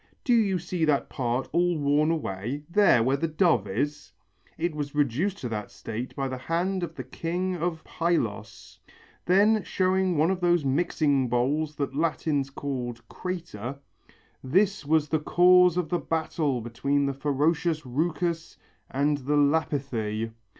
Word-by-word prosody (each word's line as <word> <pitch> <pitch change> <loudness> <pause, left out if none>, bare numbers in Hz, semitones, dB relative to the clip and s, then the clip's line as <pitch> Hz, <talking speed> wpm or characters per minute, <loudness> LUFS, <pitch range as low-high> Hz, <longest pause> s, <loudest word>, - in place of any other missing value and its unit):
Do 245 - +2
you 205 -5 +3
see 175 0 -3
that 145 -3 +1
part 125 0 -2
all 175 -1 +2
worn 145 +1 +2
away, 135 - -3
there 170 - +4
where 135 +3 +2
the 165 - -1
dove 155 - +2
is? 145 +9 -3 0.4
It 170 0 -1
was 145 -1 -5
reduced 150 - 0
to 125 - -3
that 105 -2 -4
state 120 +3 -6
by 135 -1 -1
the 130 -1 -5
hand 180 +7 -1
of 165 -2 -5
the 130 - -5
king 175 +8 -3
of 170 -1 -3
Pylos." 115 -12 -3 0.5
Then 205 +4 +4
showing 185 -1 +1
one 160 +5 +3
of 190 - -1
those 175 -4 +2
mixing 140 -2 +1
bowls 145 +6 0
that 140 -2 -3
Latins 150 -3 0
called 125 -4 -5
crater, 160 - -5 0.7
"This 190 +7 +2
was 155 -1 +3
the 155 +2 0
cause 180 +2 +5
of 180 -3 -1
the 175 - 0
battle 155 -5 -1
between 140 +5 0
the 140 - -1
ferocious 150 +3 0
Rheucus 165 +5 -2 0.3
and 145 +2 +1
the 145 +2 -1
Lapithæ." 135 -7 0
150 Hz, 150 wpm, -26 LUFS, 130-175 Hz, 0.7 s, cause